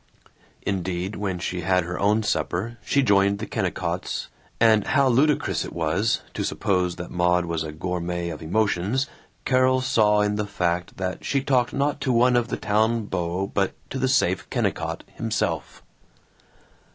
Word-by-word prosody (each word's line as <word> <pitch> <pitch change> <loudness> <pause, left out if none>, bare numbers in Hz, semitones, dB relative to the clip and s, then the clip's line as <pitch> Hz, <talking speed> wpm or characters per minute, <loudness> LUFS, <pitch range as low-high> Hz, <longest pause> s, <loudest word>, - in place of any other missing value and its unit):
Indeed, 95 0 -2
when 95 -3 -2
she 90 0 -3
had 90 +1 +2
her 90 +1 -5
own 105 +2 +2
supper, 105 +3 -2
she 140 -1 +2
joined 100 -3 +3
the 105 - -4
Kennicotts, - - -3 0.3
and 110 -2 +5
how 140 -3 +3
ludicrous 140 +4 +2
it - - -7
was 85 +8 0
to - - -2
suppose 90 -3 0
that 90 - -7
Maud 90 0 +2
was 85 -1 -2
a 80 - -5
gourmet 85 +1 -3
of 80 -2 -7
emotions 105 - +1 0.4
Carol 130 0 +3
saw 105 -5 +3
in 105 0 +1
the 105 -1 -2
fact 90 -3 -2
that 95 -1 -3
she 140 -1 0
talked 125 -4 +2
not 145 +1 0
to 130 - +1
one 125 +1 +4
of 120 -1 +2
the - - -3
town 110 +2 +1
beaux 90 0 -2
but 100 -1 +1 0.2
to - - -3
the - - +1
safe - - +1
Kennicott - - -2
himself! - - -3
100 Hz, 165 wpm, -24 LUFS, 90-115 Hz, 0.4 s, and